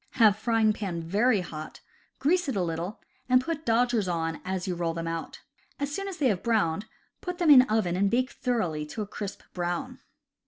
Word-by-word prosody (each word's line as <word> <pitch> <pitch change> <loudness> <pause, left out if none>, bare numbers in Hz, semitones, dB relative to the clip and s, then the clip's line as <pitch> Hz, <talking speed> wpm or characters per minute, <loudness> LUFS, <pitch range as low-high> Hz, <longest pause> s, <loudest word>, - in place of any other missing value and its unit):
Have 220 -5 +5
frying 220 0 +2
pan 185 -6 -4
very 205 +5 +2
hot, 155 -3 -8 0.4
grease 350 +2 +2
it 260 - -2
a 190 - +1
little, 170 +4 -3 0.3
and 255 0 +6
put 315 +2 -4
dodgers 230 -3 +2
on 165 -2 -2
as 185 -1 -3
you 185 - 0
roll 170 -1 -2
them 165 0 -3
out. 165 0 -5 0.4
As 285 0 -2
soon 395 +3 -3
as 385 -3 -5
they 275 -5 +3
have 195 -5 0
browned, 210 -4 +1 0.3
put 360 -1 -4
them 345 -4 +4
in 265 -3 +10
oven 210 -5 +1
and 195 +2 +2
bake 255 +4 +1
thoroughly 185 -12 -1
to 215 +8 -4
a - - -8
crisp 205 -1 -6
brown. 175 -1 -3
210 Hz, 200 wpm, -28 LUFS, 175-250 Hz, 0.4 s, in